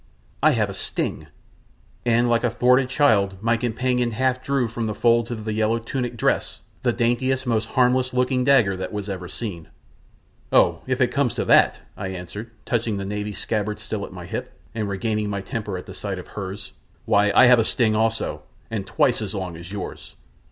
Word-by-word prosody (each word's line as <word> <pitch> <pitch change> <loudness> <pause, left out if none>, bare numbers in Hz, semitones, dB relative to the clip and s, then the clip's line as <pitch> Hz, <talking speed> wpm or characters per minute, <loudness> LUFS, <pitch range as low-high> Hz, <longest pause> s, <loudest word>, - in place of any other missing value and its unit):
I - - +5
have - - +1
a - - -6
sting," - - -3 0.8
and 120 +1 +4
like 120 0 +2
a 120 - +3
thwarted 125 +2 +3
child 100 -9 +3
my 115 +3 +2
companion 125 +1 0
half 130 +3 0
drew 135 -2 +1
from 115 0 -3
the 105 - -3
folds 115 0 +3
of 110 -3 -5
the 110 - -2
yellow 110 +1 +1
tunic 120 +1 -4
dress - - 0 0.2
the - - +2
daintiest, 130 +3 0
most 115 -2 +1
harmless 130 0 +3
looking 125 +1 +1
little 125 - 0
dagger 100 -7 +3
that 95 0 -4
was 105 -2 -4
ever 90 -2 -5
seen. 90 -6 -6 0.8
"Oh, - - +4
if - - 0
it - - +4
comes - - +1
to - - -1
that," - - +5
I 95 - -4
answered, 95 +4 -7 0.2
touching 115 -3 0
the 100 - -4
Navy 105 +1 -3
scabbard 105 0 -2
still 105 -1 -5
at - - -7
my 90 -2 -8
hip, - - -6
and 110 -3 -2
regaining 105 +2 -1
my 100 -1 -2
temper 100 -1 -4
at 90 - -8
the - - -9
sight 100 -2 -4
of 90 - -9
hers, 100 0 -6 0.3
"why, 105 0 +3
I - - +8
have 125 -1 +7
a - - +4
sting 110 -1 +1
also 115 +1 0 0.3
and 100 -4 -3
twice 115 +3 +2
as 105 -1 -4
long 95 -3 -4
as 85 +2 -10
yours! 100 -2 -7
110 Hz, 200 wpm, -23 LUFS, 100-120 Hz, 0.8 s, I